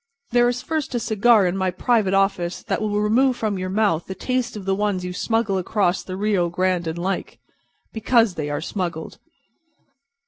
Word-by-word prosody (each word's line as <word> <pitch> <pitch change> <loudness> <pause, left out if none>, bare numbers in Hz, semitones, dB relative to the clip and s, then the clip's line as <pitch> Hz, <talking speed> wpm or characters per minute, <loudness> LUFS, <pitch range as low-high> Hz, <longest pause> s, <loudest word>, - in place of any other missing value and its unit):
There 240 0 +4
is 245 +1 -3
first 310 -3 -3
a - - +1
cigar 220 -1 +3
in 180 +1 0
my 190 -1 0
private 195 +1 +1
office 195 -3 0
that - - -2
will 210 -1 0
remove 245 +5 +2
from 210 -4 -2
your 185 0 -3
mouth 195 -5 +1
the 190 - -5
taste 255 -1 -2
of 195 - -8
the 195 - +1
ones 195 -2 -1
you 180 - -4
smuggle 220 0 0
across 185 0 0
the 185 0 -7
Rio 200 -4 +1
Grande 180 0 0
and 160 +1 -3
like—because 220 +4 -2
they 150 -4 -4
are 145 - -2
smuggled." 170 -3 -4
195 Hz, 180 wpm, -22 LUFS, 185-225 Hz, -, There